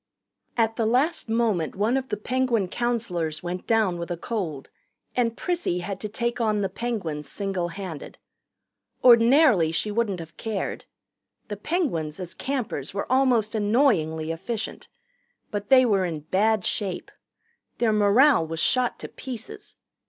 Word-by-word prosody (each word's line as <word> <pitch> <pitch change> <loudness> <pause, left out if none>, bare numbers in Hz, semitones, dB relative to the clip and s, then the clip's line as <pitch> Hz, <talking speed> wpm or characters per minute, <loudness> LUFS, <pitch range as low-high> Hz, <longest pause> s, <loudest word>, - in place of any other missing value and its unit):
At 225 -1 +1
the 225 -2 +1
last 260 +4 +1
moment 225 -8 0
one 215 +6 +1
of 265 -1 -1
the 210 - -2
Penguin 235 -3 0
counselors 185 -10 -2
went 180 +1 -5
down 215 -6 +2
with 170 - -5
a 175 - -3
cold, 165 - -4 0.5
and 230 -2 0
Prissy 345 - -1
had 195 +1 -5
to 210 - -5
take 235 +3 -2
on 215 -2 +1
the 195 - 0
Penguins 185 -10 -4
single 190 -1 -2
handed. 175 -3 -7 0.9
Ordinarily 235 - +6
she 210 +6 -1
wouldn't 205 -4 0
have 165 0 -10
cared. 220 -3 -4 0.6
The 205 - -4
Penguins, 200 - -2
as 180 -2 -6
campers, 225 - -3
were 200 - -3
almost 250 -5 +3
annoyingly 205 - +2
efficient. 210 +7 -4 0.6
But 205 -1 -4
they 255 -1 +7
were 200 -5 +2
in 165 -4 -3
bad 200 +6 +1
shape. 195 -4 -2 0.7
Their 230 -2 +2
morale 210 - +5
was 165 0 -4
shot 250 +8 +2
to - - -5
pieces. 250 -4 -8
210 Hz, 145 wpm, -25 LUFS, 175-240 Hz, 0.9 s, they